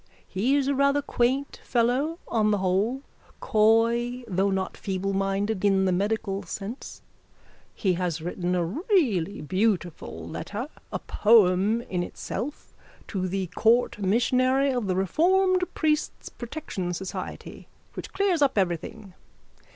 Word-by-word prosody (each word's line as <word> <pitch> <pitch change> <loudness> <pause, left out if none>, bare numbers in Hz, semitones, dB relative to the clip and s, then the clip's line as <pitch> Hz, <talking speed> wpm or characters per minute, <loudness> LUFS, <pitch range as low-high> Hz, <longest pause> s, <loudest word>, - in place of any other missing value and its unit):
He 230 +9 +1
is 280 -2 +1
a 280 - +2
rather 280 +1 +2
quaint 265 +2 0
fellow 255 +7 +1
on 215 -2 +2
the 210 - +2
whole, 200 +8 0 0.4
coy 230 +3 +2
though 195 0 +1
not 190 -1 -1
feebleminded 195 +1 -1
in 195 -1 +3
the 185 - +2
medical 200 +1 -1
sense. 200 +6 -7 0.7
He 190 -3 +1
has 175 -2 -2
written 175 +2 -2
a 175 -1 +1
really 230 - 0
beautiful 175 - -1
letter, 205 - -5 0.2
a - - -1
poem 210 0 +3
in 180 -6 -3
itself, 235 +9 -6 0.4
to 185 -3 -2
the 190 +1 -2
court 230 0 +3
missionary 255 +7 +2
of 245 -5 -1
the 185 - 0
Reformed 365 - +2
Priests' 305 -1 -1
Protection 230 - -5
Society 190 +1 -7 0.3
which - - -7
clears 385 -4 +1
up 275 -5 +3
everything. 185 +2 -2
210 Hz, 130 wpm, -26 LUFS, 190-255 Hz, 0.7 s, in